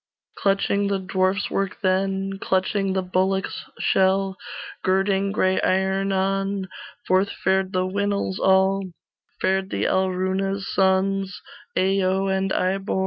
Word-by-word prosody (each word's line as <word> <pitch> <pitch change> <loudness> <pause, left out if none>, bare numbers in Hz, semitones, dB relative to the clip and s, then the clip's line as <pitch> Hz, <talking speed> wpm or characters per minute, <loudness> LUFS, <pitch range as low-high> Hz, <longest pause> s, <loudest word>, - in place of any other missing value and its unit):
Clutching 200 0 +1
the 200 0 0
dwarfs' 190 +1 0
work 195 -1 -1
then, 195 +1 0
Clutching 190 +1 0
the 190 0 0
bullock's 190 +1 -1
shell, 190 0 +2 0.5
Girding 195 +1 +1
gray 185 -2 +1
iron 190 +1 +1
on, 195 0 -1 0.4
Forth 190 +2 +3
fared 190 0 0
the 185 -1 0
Winils 200 0 -1
all, 190 +1 +3 0.6
Fared 190 +1 0
the - - -2
Alruna's 190 +1 0
sons, 190 0 +1 0.4
Ayo 190 0 +2
and 190 0 -1
Ibor. 190 +1 0
190 Hz, 115 wpm, -23 LUFS, 190-195 Hz, 0.6 s, Forth